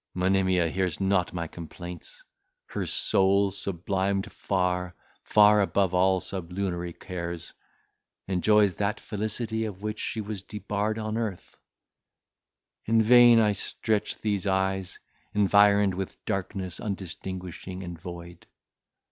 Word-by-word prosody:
Monimia 95 -1 +2
hears 90 -2 -1
not 95 -2 +1
my 85 -1 -3
complaints; 85 +1 -9 0.4
her - - -4
soul, 100 +1 +2
sublimed 95 +1 -2
far, 90 -2 -1 0.3
far 105 0 +5
above 95 -2 +1
all 95 +1 +3
sublunary 90 -1 -4
cares, 85 -1 -6 0.7
enjoys 100 +1 +3
that 105 +4 -1
felicity 110 +1 -3
of 105 -3 -6
which 105 0 -3
she 115 - -3
was 105 -2 -4
debarred 105 +1 -3
on 110 0 -2
earth. 105 -6 -5 1.3
In 115 +1 +3
vain 120 0 +8
I 105 -2 +4
stretch 105 +1 -2
these 105 -2 -1
eyes, 95 -1 0 0.4
environed 100 -1 +5
with 95 +1 -5
darkness 95 -1 -3
undistinguishing 95 -1 -6
and 85 -1 -6
void. 85 0 -9
95 Hz, 115 wpm, -27 LUFS, 90-105 Hz, 1.3 s, vain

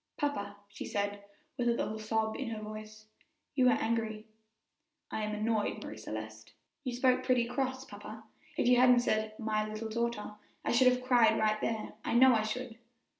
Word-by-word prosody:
"Papa," 205 -9 -2
she 200 +1 -8
said, 205 0 -2 0.4
with 245 - +1
a 235 - +4
little 220 -2 -2
sob 220 0 -1
in 270 -4 -3
her 220 -1 -4
voice, 215 0 -9 0.5
"you 260 -3 +4
are - - +4
angry." 220 -1 -1 0.9
"I - - -2
am 210 0 -2
annoyed, 215 0 -1
Marie - - -7
Celeste." 110 0 -7 0.3
"You 255 - -2
spoke 255 0 +3
pretty 250 -2 +3
cross, 260 +1 -2
papa; 215 +1 -10 0.3
if - - +2
you 250 0 +6
hadn't 250 -1 +6
said 215 -2 0
'my 215 -1 -1
little 215 +1 -5
daughter,' 235 -2 -2 0.3
I - - +1
should 255 +2 +5
have 250 0 +3
cried 245 -3 +5
right 215 0 +1
there 220 -1 -2
I - - -1
know 260 +1 +7
I 220 - +3
should." 230 +1 -4
220 Hz, 180 wpm, -32 LUFS, 215-245 Hz, 0.9 s, know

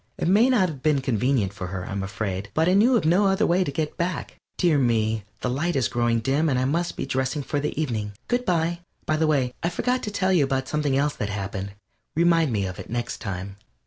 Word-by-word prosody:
It - - -1
may 215 +8 +5
not 220 -8 +4
have 150 -6 -7
been 150 -1 +3
convenient 125 -4 0
for 95 -3 -5
her, 90 0 -5
I - - -6
am 100 0 -2
afraid, 95 0 -4
but 160 +1 +3
I 180 - +4
knew 230 +6 +5
of 215 - -1
no 185 +5 +4
other 195 +3 +2
way 180 +2 +3
to 175 - -3
get 155 +1 -3
back. 175 +2 -3 0.2
Dear 165 -5 +3
me, 110 -4 +1 0.2
the - - -1
light 165 +7 -1
is 130 -3 +2
growing 120 -1 +1
dim, 140 +7 +1
and 130 - +1
I 130 - +1
must 170 +6 -1
be - - -2
dressing 130 +2 -1
for 145 - -2
the 150 +1 -3
evening. 110 -9 -2
Good 245 0 0
by! 170 -3 0 0.3
By 155 - +1
the 160 0 +2
way, 135 -5 +1
I 170 - +1
forgot 250 +7 0
to - - -3
tell 190 -2 +1
you 150 -7 +3 0.2
something 145 -1 0
else 145 +1 +1
that 105 - -2
happened 100 -1 -4 0.4
remind 165 -3 +3
me 100 -3 0
of 90 -1 -6
it - - -8
next 120 0 -3
time! 95 -2 -5
140 Hz, 240 wpm, -24 LUFS, 110-170 Hz, 0.4 s, may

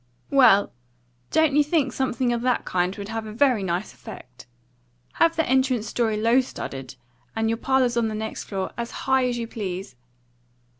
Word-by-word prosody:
"Well, 250 -8 +5 0.6
don't 315 -3 +3
you 295 - +5
think 290 -4 0
something 255 -2 0
of 235 - -2
that 250 0 0
kind 180 +1 0
would 200 0 -7
have 225 -1 -4
a - - -7
very 245 -1 +2
nice 180 -1 -2
effect? 125 0 -12 0.7
Have 330 0 +5
the 320 - 0
entrance 260 -3 +2
story 220 0 0
low 230 +4 +4
studded, 135 - -7 0.4
and 225 0 0
your 230 - -1
parlours 255 -1 +1
on 235 -1 +1
the 215 - -3
next 220 0 -5
floor 190 -2 -4
as 235 0 -3 0.2
high 265 -1 +3
as 245 -1 -2
you 235 - -3
please. 195 - -6
230 Hz, 180 wpm, -24 LUFS, 200-260 Hz, 0.7 s, Well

